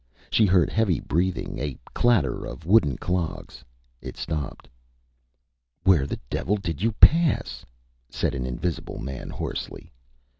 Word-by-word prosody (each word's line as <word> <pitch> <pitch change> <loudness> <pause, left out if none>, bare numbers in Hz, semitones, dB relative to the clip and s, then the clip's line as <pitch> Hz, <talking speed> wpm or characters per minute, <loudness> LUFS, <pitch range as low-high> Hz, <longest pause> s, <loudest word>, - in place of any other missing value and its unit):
She 110 - +4
heard 90 -3 +3
heavy 105 -7 +2
breathing, 90 +4 -1
a 70 -2 -3 0.2
clatter 120 -5 +2
of 80 - -8
wooden 85 - +4
clogs. 90 -3 -3 0.4
It - - -8
stopped. 75 -5 -4 1.2
ÂWhere 85 -8 +4
the - - -4
devil 105 +10 -1
did 85 -5 -4
you 115 +1 +1
pass?Â 125 - +4 0.5
said - - -1
an 65 -2 -3
invisible 80 +7 -3
man, 65 -2 -6
hoarsely. - - -6
85 Hz, 125 wpm, -25 LUFS, 70-100 Hz, 1.2 s, She